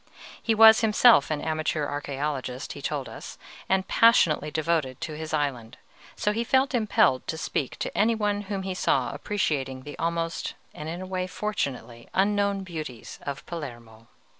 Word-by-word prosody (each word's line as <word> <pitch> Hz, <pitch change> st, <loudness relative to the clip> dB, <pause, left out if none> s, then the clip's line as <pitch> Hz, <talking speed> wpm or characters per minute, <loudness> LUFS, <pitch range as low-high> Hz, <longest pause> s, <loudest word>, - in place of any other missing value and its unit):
He 225 Hz, -, +1 dB
was 220 Hz, +1 st, +8 dB
himself 220 Hz, -, +5 dB
an 150 Hz, -2 st, -1 dB
amateur 155 Hz, -1 st, -1 dB
archæologist, 140 Hz, -2 st, -4 dB
he -, -, -8 dB
told -, -, -3 dB
us, -, -, -9 dB, 0.3 s
and 190 Hz, 0 st, +1 dB
passionately 170 Hz, -10 st, +4 dB
devoted 155 Hz, -4 st, -1 dB
to 155 Hz, -, -4 dB
his 155 Hz, 0 st, -6 dB
island; 130 Hz, -6 st, -2 dB, 0.4 s
so 210 Hz, -, 0 dB
he 225 Hz, +2 st, -1 dB
felt 265 Hz, +3 st, +2 dB
impelled 215 Hz, -, +2 dB
to 160 Hz, -, -3 dB
speak 140 Hz, -3 st, -3 dB
to -, -, -4 dB
any 225 Hz, +2 st, +3 dB
one 205 Hz, -1 st, 0 dB
whom 195 Hz, -2 st, -2 dB
he 190 Hz, 0 st, -3 dB
saw 135 Hz, -7 st, +1 dB
appreciating 140 Hz, -6 st, -2 dB
the 145 Hz, -, -8 dB
almost 165 Hz, 0 st, -2 dB, 0.2 s
and 150 Hz, +1 st, -7 dB
in 170 Hz, +2 st, -5 dB
a -, -, -6 dB
way 185 Hz, 0 st, -3 dB
fortunately 140 Hz, -, -4 dB
unknown 200 Hz, 0 st, +2 dB
beauties 155 Hz, -10 st, -7 dB
of 140 Hz, -2 st, -5 dB
Palermo. 120 Hz, -8 st, -8 dB
160 Hz, 165 wpm, -26 LUFS, 140-205 Hz, 0.4 s, was